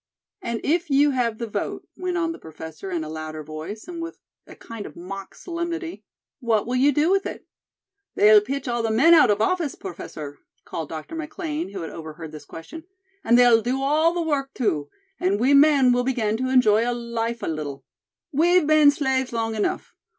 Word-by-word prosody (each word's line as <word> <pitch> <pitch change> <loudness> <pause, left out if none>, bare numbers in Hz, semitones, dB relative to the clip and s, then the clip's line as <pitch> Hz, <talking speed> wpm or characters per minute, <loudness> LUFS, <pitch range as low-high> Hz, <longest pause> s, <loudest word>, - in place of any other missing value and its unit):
"And 235 -1 -3
if 335 +2 0
you 285 +1 +4
have 240 -4 0
the 235 - -3
vote," 220 - -4
went 365 -1 -3
on 335 -1 0
the 330 - -8
Professor 160 +3 -9
in 170 -3 -2
a - - -6
louder 155 0 -6
voice, 155 - -8
and 345 -2 -6
with 330 +1 -6 0.3
a - - -12
kind 230 -3 -8
of - - -13
mock 190 +2 -8
solemnity, 340 0 -5 0.4
"what 230 -5 +1
will 245 - -2
you 270 +3 +4
do 300 +5 +2
with 390 0 +2
it?" - - -8 0.7
"They'll 210 0 +7
pitch 265 +4 -4
all 240 -1 0
the 225 - -1
men 270 +10 +5
out 320 - +7
of 205 0 +2
office, 330 +4 0
Professor," 155 -6 -8 0.3
called 160 -3 -5
Dr. 160 - -7
McLean, 320 0 -4
who 195 -2 -6
had 160 - -6
overheard 160 0 -8
this 150 -1 -10
question; 315 - -10 0.4
"and 235 +1 +4
they'll 240 -2 +6
do 250 +4 -1
all 310 +4 +3
the 345 - 0
work, 280 -4 -2
too, 150 - -1 0.3
and 195 +3 +1
we 260 +5 +3
men 280 -3 +6
will 245 0 +1
begin 235 -5 0
to 255 +2 -2
enjoy 240 -2 +4
life 235 -1 -3
a - - -2
little. 150 -3 -5 0.5
We've 345 +3 +4
been 305 -1 +6
slaves 265 -3 0
long 225 -1 -1
enough. 215 -1 -2
240 Hz, 195 wpm, -24 LUFS, 195-300 Hz, 0.7 s, They'll